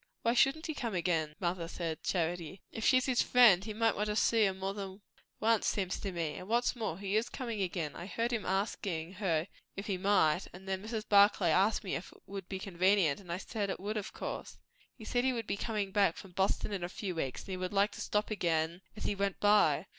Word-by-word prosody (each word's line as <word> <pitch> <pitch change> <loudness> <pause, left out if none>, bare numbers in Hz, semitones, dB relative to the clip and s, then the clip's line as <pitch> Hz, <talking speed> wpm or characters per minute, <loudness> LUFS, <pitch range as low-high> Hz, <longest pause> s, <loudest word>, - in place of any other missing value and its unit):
"Why 230 - +3
shouldn't 270 +6 +3
he 315 - -2
come 235 -8 -3
again, 165 -4 0
mother?" 175 -2 -1
said 165 -2 -4
Charity. 175 0 -2
"If 225 - -5
she's 255 +2 +4
his 255 -3 +2
friend, 225 -7 +6
he 215 - -5
might 225 +1 +1
want 210 +1 -1
to 210 - -1
see 225 0 +4
her 190 - -1
more 190 +1 -3
than 195 0 -7 0.4
once, 225 -1 +2
seems 190 -3 -1
to 195 - -3
me. 165 -4 -3
And 185 - -8
what's 240 +3 +1
more, 215 -8 -3
he 200 +1 -2
is 220 +2 +1
coming 230 -5 -4
again. 170 -5 -2
I 175 - -7
heard 230 +3 -1
him 230 - -1
askin' 190 -3 -2
her 170 -4 +1 0.3
if 195 - -4
he 190 -3 -2
might; 185 -4 +3
and 190 +2 -12
then 190 0 -2
Mrs. 220 +1 -4
Barclay 200 -4 +5
asked 195 +6 +3
me 190 - -3
if 175 - -4
it - - -18
would 195 -2 -7
be 190 - -3
convenient, 185 -3 +2
and 180 -4 -10
I 170 - -1
said 205 +1 -3
it - - -3
would, 205 +3 -3
of 210 -2 -3
course. - - -6 0.4
He 220 - -10
said 245 +2 +1
he 260 0 +2
would 230 -2 -3
be - - -1
comin' 205 -2 -2
back 195 -4 +3
from 195 - -10
Boston 190 +3 0
in 190 -3 -3
a 175 - -3
few 190 0 -4
weeks, 135 -6 -3
and - - -14
he 185 - -3
would 185 0 -3
like 200 +1 +3
to - - -8
stop 210 +1 -1
again 170 -3 0 0.2
as - - -6
he - - 0
went 200 -1 -1
by. 205 -6 +4
195 Hz, 245 wpm, -32 LUFS, 175-215 Hz, 0.4 s, friend